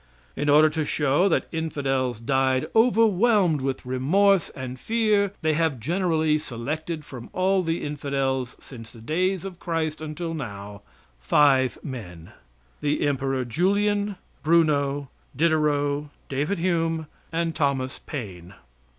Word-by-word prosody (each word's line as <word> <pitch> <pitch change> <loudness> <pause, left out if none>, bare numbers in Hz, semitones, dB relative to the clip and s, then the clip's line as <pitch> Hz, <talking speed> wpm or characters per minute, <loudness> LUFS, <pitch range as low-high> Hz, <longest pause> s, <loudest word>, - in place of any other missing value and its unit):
In 145 0 -1
order 150 +2 +7
to 155 0 -1
show 145 +5 +2
that - - +1
infidels 135 -7 -1
died 130 +1 +1
overwhelmed 220 - +4
with 135 -1 -3
remorse 170 +9 +3
and 130 -1 -6
fear 215 - +1
they 155 0 +2
have 155 -4 0
generally 160 - +1
selected 155 +5 -5
from 125 -5 -9
all 190 +1 +2
the 165 -1 -2
infidels 135 -3 -2
since 115 -4 -11
the 115 - -14
days 180 +9 -1
of 185 -3 -7
Christ 160 -2 -2
until 165 +2 -4
now 100 -8 -7 0.4
five 130 - +3
men 90 - -8 0.5
the 150 0 0
Emperor 135 -2 0
Julian, 200 - +1 0.3
Bruno, 145 -4 +2 0.3
Diderot, 150 -1 +1 0.2
David 145 +8 -1
Hume 165 -2 0 0.3
and 165 0 -1
Thomas 135 -4 -1
Paine. 95 - -7
150 Hz, 125 wpm, -25 LUFS, 130-170 Hz, 0.5 s, order